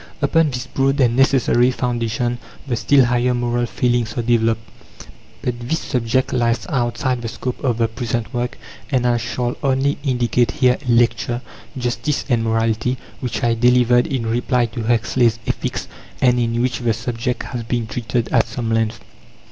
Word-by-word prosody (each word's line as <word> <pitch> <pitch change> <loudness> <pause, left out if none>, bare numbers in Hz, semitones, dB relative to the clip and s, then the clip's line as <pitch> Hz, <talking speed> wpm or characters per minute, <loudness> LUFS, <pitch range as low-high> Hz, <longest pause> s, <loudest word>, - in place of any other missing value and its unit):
Upon 155 +2 +3
this 125 -1 -4
broad 135 +2 0
and 120 -3 +3
necessary 130 -2 +4
foundation 120 -1 -1 0.3
the 125 -4 -1
still 130 +4 +4
higher 125 +1 +1
moral 120 0 0
feelings 120 -1 0
are 120 - 0
developed. 115 -1 +1 0.8
But 120 -1 -2
this 120 +7 -1
subject 125 -1 -1
lies 120 -1 +1
outside 125 -2 -1
the 115 - -4
scope 125 +3 -5
of 120 -4 +1
the 115 -1 +2
present 115 +1 -3
work, 120 0 -2 0.3
and 130 -4 +1
I 120 -1 +3
shall 120 +2 -2
only 135 +1 +1
indicate 125 -3 +1
here 130 -4 +3
a 125 - -1
lecture, 120 +1 +2 0.3
"Justice 125 +4 -1
and 120 -3 +2
Morality" 115 +2 0 0.2
which 125 +1 -3
I 120 -1 +3
delivered 120 +1 +4
in 130 -4 -2
reply 120 +2 +1
to 115 0 -5
Huxley's 115 0 +2
Ethics, - - -3 0.3
and 125 -1 +3
in 115 0 0
which 125 -2 -1
the 120 -2 +1
subject 115 +1 -3
has 120 -3 -5
been 115 0 -2
treated 115 +1 -2
at 115 -3 +3
some 115 0 -3
length. 115 -1 0
120 Hz, 165 wpm, -20 LUFS, 115-125 Hz, 0.8 s, necessary